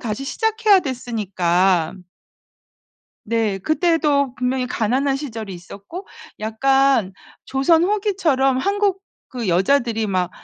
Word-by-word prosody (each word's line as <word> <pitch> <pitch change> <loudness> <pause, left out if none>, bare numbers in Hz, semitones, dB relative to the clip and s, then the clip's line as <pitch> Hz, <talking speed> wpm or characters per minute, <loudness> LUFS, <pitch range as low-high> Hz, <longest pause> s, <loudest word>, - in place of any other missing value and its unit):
다시 230 +3 -4
시작해야 440 - +2
됐으니까 190 - 0 1.3
네. 220 -3 -1
그때도 300 - +1
분명히 250 0 -1
가난한 260 +5 0
시절이 225 -8 -6
있었고 200 - -10 0.3
약간 260 -1 +2 0.3
조선 320 +5 +2
후기처럼 360 -10 +1
한국 400 +4 0 0.3
그 240 -6 -5
여자들이 225 +4 +1
막 185 -3 -1
260 Hz, 240 characters per minute, -20 LUFS, 215-310 Hz, 1.3 s, 시작해야